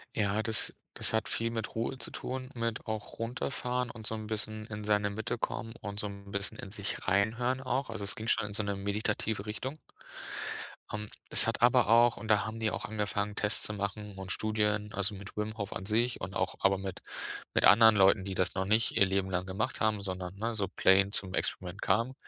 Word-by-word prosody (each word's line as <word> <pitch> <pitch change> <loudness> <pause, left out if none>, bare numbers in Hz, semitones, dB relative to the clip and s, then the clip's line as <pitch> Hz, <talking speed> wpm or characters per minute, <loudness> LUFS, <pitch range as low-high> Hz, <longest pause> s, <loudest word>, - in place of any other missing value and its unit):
Ja, 105 0 +1
das 110 -1 +1 0.2
das - - +2
hat 110 -1 +1
viel 115 0 0
mit 115 -1 -4
Ruhe 115 +4 -1
zu - - -5
tun, 130 0 -5
mit 115 -1 -1
auch 110 +1 -5
runterfahren 125 +1 -2
und 110 -3 -5
so 110 - -2
'n 110 - -6
bisschen 110 0 -3
in 105 -1 -6
seine 105 -1 +2
Mitte 110 +3 -3
kommen 115 0 -3
und 100 0 -4
so 105 - -2
'n 100 0 -10
bisschen 100 0 -2
in 95 - -8
sich 100 -1 -3
reinhören 115 +7 +1
auch. 130 0 -1
Also, 110 -2 -5
es 100 - -2
ging 110 - -6
schon 105 -2 +2
in 100 - -9
so 110 - +2
'ne 100 0 -1
meditative 105 +1 -1
Richtung. 130 +7 -4 1.2
Ähm, 105 0 -3 0.2
das - - +7
hat - - -1
aber 120 -3 +5
auch 115 +1 +6
und 110 - -8
da 105 0 +4
haben 110 +1 -5
die 110 -1 +2
auch - - -4
angefangen, 105 -1 -2
Tests 105 0 +2
zu 105 - -1
machen 105 0 -4
und 95 -1 -3
Studien, 105 -1 +1
also, 100 +1 -1
mit 100 +1 -10
Wim 110 +1 -3
Hof 100 -2 -4
an 95 - -5
sich 115 +3 +1
und 95 +1 -5
auch 95 - -1
aber 95 -1 +3
mit 95 -1 -5 0.5
mit - - +3
anderen 110 +2 +8
Leuten, 95 0 +5
die 95 -1 -4
das 90 0 +1
noch 95 - 0
nicht 110 +4 +3
ihr 100 - +6
Leben 95 0 0
lang 90 0 -1
gemacht 95 +3 -2
haben, 110 -1 +2
sondern, 95 -1 -5
ne, 115 +2 -2
so 100 -3 -1
plain 95 +1 +4
zum 95 -3 -2
Experiment 95 +2 -1
kamen. 115 +7 +2
105 Hz, 220 wpm, -31 LUFS, 100-110 Hz, 1.2 s, anderen